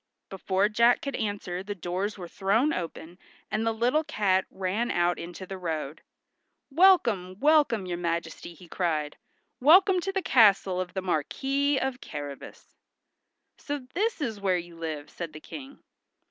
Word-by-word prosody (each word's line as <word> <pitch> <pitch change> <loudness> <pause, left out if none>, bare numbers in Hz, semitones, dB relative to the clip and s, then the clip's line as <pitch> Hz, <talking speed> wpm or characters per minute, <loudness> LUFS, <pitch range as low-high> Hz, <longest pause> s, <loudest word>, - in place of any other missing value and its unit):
Before 195 0 0
Jack 235 +3 +3
could 275 -2 -3
answer 200 -4 -3
the 205 +1 -6
doors 185 +4 -3
were 180 -2 -7
thrown 210 - +1
open, 170 0 -6 0.3
and 215 +1 0
the 225 - +1
little 245 +8 +1
cat 190 -8 +1
ran 195 +5 -2
out 175 0 +1
into 175 +2 -7
the 190 0 -7
road. 160 -4 -4 0.7
"Welcome, 235 - +4
welcome, 290 -8 +3
your 175 -1 -4
majesty," 170 0 -4
he 175 +2 -15
cried. 155 -4 -2 0.4
"Welcome 370 +7 +6
to 390 +2 -3
the 385 -1 -2
castle 195 - +4
of 180 +1 -7
the 190 - -2
Marquis 270 - 0
of 265 -1 -2
Carrabas." 145 -2 -8 0.9
"So 290 0 -3 0.2
this 425 -1 -1
is 220 -7 -3
where 190 -2 +2
you 175 -1 -8
live," 155 -3 -5
said 170 -3 -6
the 155 - -9
King. 275 - -11
195 Hz, 155 wpm, -27 LUFS, 175-255 Hz, 0.9 s, Welcome